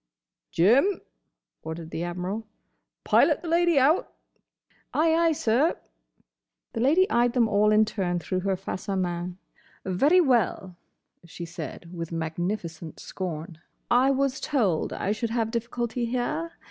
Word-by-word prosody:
"Jim," 250 - +3 0.6
ordered 160 0 -7
the 165 - -3
Admiral, 180 +5 -4 0.6
"pilot - - +3
the - - -5
lady 340 -1 +3
out." 285 +6 +3 0.8
"Ay, 320 +1 +3
ay, 330 0 +3
sir." 290 0 +1 1.0
The - - -3
Lady 315 +10 +4
eyed 240 0 +3
them 240 -3 +3
all 210 0 +3
in 215 +1 +5
turn 185 -5 -2
through 185 +2 -2
her 195 +1 0
face 185 +1 -6
à 195 -1 0
main. 175 0 -3 0.5
"Very 280 - +4
well," 235 - +1 0.5
she 170 0 -8
said, 170 +1 -8
with 170 -1 -5
magnificent 165 0 -4
scorn. 165 -3 -6 0.3
"I 250 +3 +5
was 275 0 +1
told 220 - 0
I 200 - -2
should 225 +2 -2
have 225 -1 -1
difficulty 235 +1 -2
here. 255 +8 -2
215 Hz, 135 wpm, -26 LUFS, 175-265 Hz, 1.0 s, in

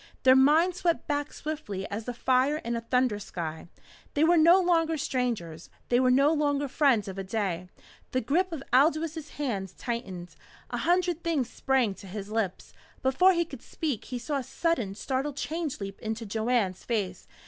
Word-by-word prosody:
Their 260 0 +7
minds 315 +7 +4
swept 340 -2 +1
back 290 -1 -2
swiftly 250 -12 -5
as 215 +2 -4
the 245 - -3
fire 260 +4 +2
in 235 -5 -3
a 230 - -2
thunder 250 -2 +1
sky. 165 -5 -6 0.5
They 295 - +3
were 340 +2 +5
no 335 +3 +7
longer 330 -3 +2
strangers. 230 - -2 0.2
They 245 - +4
were 255 0 +4
no 275 +5 +4
longer 290 -2 +1
friends 260 -7 +2
of 195 0 -6
a - - -3
day. 185 -3 -2 0.4
The 255 - 0
grip 345 +10 +1
of 305 -5 -5
Aldous' 310 +2 +2
hands 205 -10 -3
tightened. 190 -7 -5 0.4
A - - -2
hundred 350 -1 +1
things 295 -8 0
sprang 260 -6 +1
to 195 - -12
his 200 +2 -7
lips. 215 -5 -2 0.3
Before 360 +9 +5
he 340 -1 +1
could 270 -6 -10
speak, 280 -9 -4
he 250 - -4
saw 280 +4 -2
a 270 - -3
sudden, 245 - -1
startled 270 +5 -2
change 315 -2 -3
leap 195 -1 -6
into 220 +1 -4
Joanne's 220 -2 0
face. 200 -6 -3
255 Hz, 180 wpm, -28 LUFS, 210-310 Hz, 0.5 s, Their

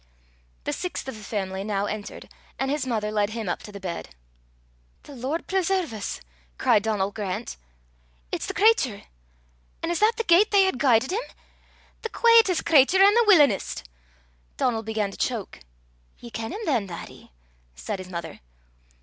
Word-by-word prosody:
The - - -2
sixth 360 -6 -4
of 265 - -5
the 215 - -11
family 195 -2 -3
now 200 -1 -1
entered, 210 0 -6 0.3
and 270 0 -1
his 285 -3 -1
mother 215 -3 -1
led 205 -1 +1
him 220 -2 -5
up 175 - -2
to 210 - -10
the 200 - -9
bed. 170 - -6 0.9
"The 290 - -12
Lord 265 +7 -3
preserve 375 -6 0
's!" 210 -2 -5 0.4
cried 210 - +3
Donal 205 -2 -1
Grant, 190 - -4 0.8
"it's - - -3
the - - -5
cratur! 390 - +3 0.8
An' 330 - -1
is 345 - -1
that 435 +2 +4
the 460 - -1
gait 390 +2 +5
they 400 -2 +5
hae 380 - +3
guidit 255 0 +2
him! 425 +5 0 0.8
The 455 - -4
quaietest 460 -7 +4
cratur 325 +2 +5
an' 400 +1 +7
the 470 +1 +4
willin'est!" 295 - +4 0.7
Donal 230 -3 +1
began 220 -2 -2
to - - -11
choke. 230 - -3 0.6
"Ye 235 - -11
ken 225 +3 -5
him 410 +5 -5
than, 240 -9 0
laddie?" 170 - -10 0.4
said 65 - -5
his 185 0 -9
mother. 170 -3 -6
235 Hz, 165 wpm, -25 LUFS, -, 0.9 s, an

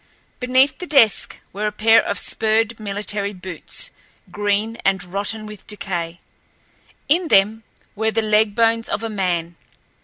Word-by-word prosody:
Beneath 255 +2 +2
the 360 - -6
desk 235 -9 +3
were 210 +2 -2
a - - -1
pair 225 +2 +5
of 200 - -2
spurred 220 +1 +2
military 205 0 -3
boots, 185 - -4 0.4
green 205 +2 -1
and 190 -2 +1
rotten 205 +4 -3
with 210 -2 -11
decay. 180 -5 -4 0.9
In 335 +4 +2
them 215 -1 +3 0.3
were 220 +1 0
the 225 0 0
leg 215 -1 +2
bones 230 0 +2
of 215 - -2
a 225 - -3
man. 175 -4 -2
210 Hz, 145 wpm, -20 LUFS, 195-225 Hz, 0.9 s, pair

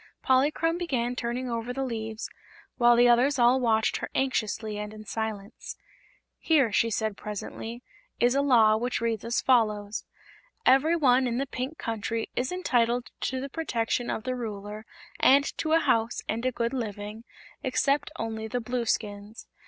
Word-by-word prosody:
Polychrome 305 +6 +2
began 250 -8 -1
turning 245 +1 -3
over 235 0 -3
the 270 +2 -2
leaves, 225 -3 -4 0.5
while 240 -1 +6
the 240 +1 +6
others 250 +4 +4
all 245 +1 +5
watched 220 -3 +2
her - - -5
anxiously 220 -5 -1
and 210 +1 -6
in 215 0 -11
silence. 215 0 -5 0.6
"Here," 285 -9 +3
she 230 +2 +2
said 220 -1 -1
presently, 225 +3 -7 0.4
"is 245 +1 +4
a 275 - +2
Law 225 -6 +5
which 245 +2 -1
reads 230 -2 -1
as 235 +1 0
follows: 215 -4 +2 0.6
'Everyone 265 -2 +4
in 240 0 -1
the 275 - 0
Pink 260 +4 -5
Country 225 0 -3
is 255 +1 -1
entitled 245 -9 0
to 260 - -2
the 270 - -4
protection 245 -5 -2
of 220 - -3
the 255 - -2
Ruler 210 -2 -6 0.3
and 280 +2 +6 0.2
to 315 0 0
a 325 - +6
house 230 -6 +1
and 230 +3 -1
a - - +1
good 235 +1 -2
living, 210 -2 -5 0.4
except 280 +2 +1
only 220 -3 -4
the 245 +2 -2
Blueskins. 220 -3 -3
235 Hz, 160 wpm, -27 LUFS, 220-260 Hz, 0.6 s, while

